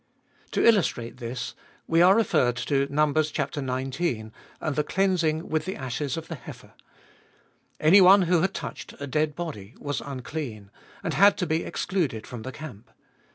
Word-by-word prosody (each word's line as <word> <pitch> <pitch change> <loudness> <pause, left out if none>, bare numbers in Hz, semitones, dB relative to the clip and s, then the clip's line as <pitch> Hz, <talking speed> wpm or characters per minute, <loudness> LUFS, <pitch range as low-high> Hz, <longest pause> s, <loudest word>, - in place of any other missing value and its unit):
To - - +2
illustrate 160 - +2
this, 120 0 -5 0.3
we 165 +1 +3
are 185 +2 +7
referred 130 - +2
to 135 +3 0
Numb. 150 0 +2
xix. 155 0 0
and 135 -3 -2 0.4
the 150 - +1
cleansing 170 -3 +1
with 155 0 -1
the 190 - -3
ashes 135 +3 -3
of 165 0 -6
the 165 - -5
heifer. 150 - -11 1.1
Anyone 190 +4 +7
who 175 -1 +3
had 190 - 0
touched - - -7
a 145 - -4
dead 150 +2 0
body 125 - -6
was 145 0 -3
unclean, 130 -6 -6 0.3
and - - -2
had 200 +1 +5
to 180 - -1
be 160 0 0
excluded 145 - -2
from 120 -3 -8
the 130 - -6
camp. 125 -7 -10
150 Hz, 155 wpm, -26 LUFS, 125-170 Hz, 1.1 s, are